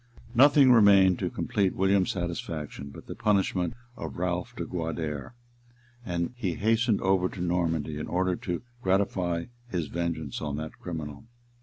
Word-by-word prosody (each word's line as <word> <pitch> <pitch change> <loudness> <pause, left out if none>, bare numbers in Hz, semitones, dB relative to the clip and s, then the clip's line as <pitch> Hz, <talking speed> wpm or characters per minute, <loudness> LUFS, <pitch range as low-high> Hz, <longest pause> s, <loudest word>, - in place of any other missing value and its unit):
Nothing 135 +1 +7
remained 100 -5 +6
to - - -1
complete 100 -3 0
William's 95 0 +3
satisfaction 85 -5 -4
but - - -11
the - - -6
punishment 95 -1 +1 0.2
of 80 -5 -6
Ralph 90 +6 -2
de 85 - -4
Guader; 80 - -4 0.7
and 85 0 -2
he 95 -9 -2
hastened 115 +1 +2
over 95 -1 +2
to - - -10
Normandy, 80 -4 0
in - - -4
order 90 0 +1
to 90 +3 -4 0.2
gratify 95 -4 +1 0.2
his 85 -9 -2
vengeance 85 -4 -3
on 75 -2 -3
that 80 0 -6
criminal. 80 -2 -6
90 Hz, 145 wpm, -28 LUFS, 80-100 Hz, 0.7 s, Nothing